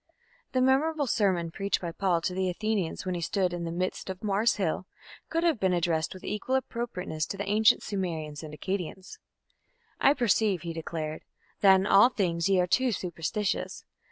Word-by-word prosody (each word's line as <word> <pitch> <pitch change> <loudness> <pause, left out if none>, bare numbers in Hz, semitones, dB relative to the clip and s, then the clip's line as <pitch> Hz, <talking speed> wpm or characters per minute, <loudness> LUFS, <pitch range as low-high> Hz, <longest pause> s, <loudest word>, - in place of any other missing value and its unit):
The 255 - +2
memorable 285 +4 +2
sermon 185 -8 +1
preached 200 +3 -1
by 170 -2 -4
Paul 175 -1 +1
to 180 - -2
the 185 0 0
Athenians 200 -2 -2
when 185 - -1
he 175 - -3
stood 185 +1 0
"in 175 -1 -3
the 165 - -3
midst 185 +2 -3
of 190 +3 -6
Mars' 210 +3 +2
hill", 185 -1 -2 0.4
could 330 +1 0
have 330 -9 +2
been 190 -2 +2
addressed 165 -1 0
with 185 - -11
equal 210 +5 -2
appropriateness 210 -11 -3
to 195 - -5
the 200 0 -4
ancient 215 +1 +4
Sumerians 160 -7 -3
and 155 -2 -8
Akkadians. 185 - -5 0.8
"I 275 - +5
perceive", 215 - +2
he 170 -1 -4
declared, 160 -1 -4 0.4
"that 195 -1 +7
in 190 0 +1
all 205 +4 +7
things 175 -6 0
ye 190 -1 +4
are 180 - +3
too 255 +7 +2
superstitious.... 190 +2 -3
190 Hz, 185 wpm, -28 LUFS, 170-215 Hz, 0.8 s, that